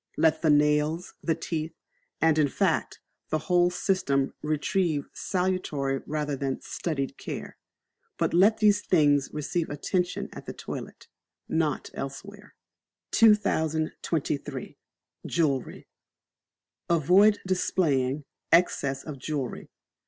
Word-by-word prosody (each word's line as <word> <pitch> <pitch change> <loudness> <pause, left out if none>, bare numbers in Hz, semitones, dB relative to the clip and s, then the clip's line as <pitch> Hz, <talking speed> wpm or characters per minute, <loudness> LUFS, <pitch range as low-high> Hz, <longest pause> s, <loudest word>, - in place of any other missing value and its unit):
Let 160 0 +3
the 160 - +2
nails, 150 +3 +2
the 165 - 0
teeth, 160 -1 -4 0.4
and, 160 -1 +3
in 150 - +4
fact, - - 0 0.3
the 155 - +1
whole 175 +2 +3
system 180 -7 0
receive 155 +1 0
salutary 180 -8 -1
rather 150 -1 -2
than 135 -1 -2
studied 140 -6 -4
care. - - -6 0.6
But - - 0
let 200 +6 +5
these 205 -2 +4
things 145 -7 +3
receive 160 +3 -2
attention 180 +5 -2
at - - -10
the - - -5
toilet - - -8 0.4
not 160 -3 -1
elsewhere. 200 +10 -8 0.6
2023. 160 - +1 0.5
Jewellery. 145 -6 -1 1.0
Avoid 185 +6 +5
displaying 150 -7 +1 0.3
Excess 140 -5 +2
of 150 -4 -7
Jewellery. 135 -2 -4
155 Hz, 105 wpm, -27 LUFS, 145-180 Hz, 1.0 s, let